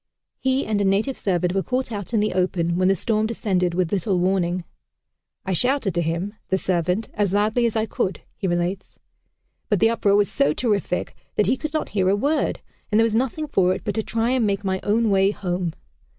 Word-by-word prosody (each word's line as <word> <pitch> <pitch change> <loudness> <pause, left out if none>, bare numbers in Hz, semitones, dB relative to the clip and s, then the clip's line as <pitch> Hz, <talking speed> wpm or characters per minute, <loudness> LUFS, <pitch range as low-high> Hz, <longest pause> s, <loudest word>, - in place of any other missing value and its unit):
He 265 +1 +1
and 210 -2 0
a - - +2
native 200 +7 +1
servant 180 -2 0
were 195 - +1
caught 255 +3 -2
out 205 -2 -5
in 220 -3 +2
the 215 - 0
open, 180 -2 0
when 185 +1 +2
the 195 - +4
storm 215 +3 0
descended 185 -6 0
with 180 -2 0
little 195 -1 0
warning. 180 -1 +1 0.8
"I 190 - -1
shouted 245 - +1
to 170 - 0
him 170 +5 -2 0.2
(the 190 - +2
servant) 180 +3 0
as 205 -2 0
loudly 215 +4 +2
as 230 - -3
I 220 0 +1
could," 195 -3 -2
he 195 - -3
relates, 175 +2 -2 0.7
"but 205 -4 +2
the 225 +4 +4
uproar 205 -3 +2
was 205 -1 +4
so 145 +2 +1
terrific 205 -6 -1 0.2
that 210 - +3
he 250 - +2
could 305 +3 -5
not 310 - -1
hear 190 -2 +1
a 195 - +4
word, 285 +9 0 0.3
and 210 - +3
there 225 - +5
was 225 - 0
nothing 265 +6 0
for 185 -10 +2
it - - -8
but 205 - -2
to 220 - 0
try 225 +2 -1
and 250 -4 +2
make 200 0 -1
my 190 -1 -1
own 220 +1 +1
way 195 0 +4
home. 180 -4 -3
200 Hz, 220 wpm, -23 LUFS, 185-225 Hz, 0.8 s, there